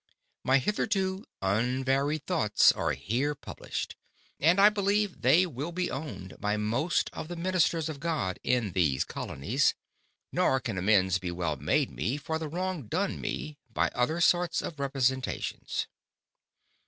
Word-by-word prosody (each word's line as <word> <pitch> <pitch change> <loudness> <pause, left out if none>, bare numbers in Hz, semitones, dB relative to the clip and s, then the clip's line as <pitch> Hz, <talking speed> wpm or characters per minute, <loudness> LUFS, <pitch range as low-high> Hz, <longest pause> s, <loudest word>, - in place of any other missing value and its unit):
My 130 +1 +4
hitherto 190 - 0 0.2
unvaried 130 +8 +1
Thoughts 105 -1 +4
are - - -1
here 120 - -1
published; - - -6 0.4
and 170 +6 +4
I 205 +1 +9
believe, 205 -1 0
they 150 +9 +5
will 150 0 -5
be 180 +1 -2
owned 130 - -6
by 105 +1 0
most 115 +11 0
of - - -6
the 175 - -5
Ministers 170 -2 +1
of 155 -3 -5
God 150 - -2
in 120 -6 +1
these 80 -7 +2
Colonies; 120 - 0 0.6
nor 130 - +2
can 115 -7 -3
amends 95 -2 +3
be 90 -1 -4
well 85 -3 -2
made 130 - +1
me, 130 +5 -2
for 160 +2 -3
the 160 -2 -4
wrong 180 - -3
done 195 - -1
me, 150 -1 -4
by - - +1
other 125 +7 0
sorts 175 0 +3
of 155 - -6
Representations. 130 -2 -1
140 Hz, 145 wpm, -29 LUFS, 110-170 Hz, 0.6 s, I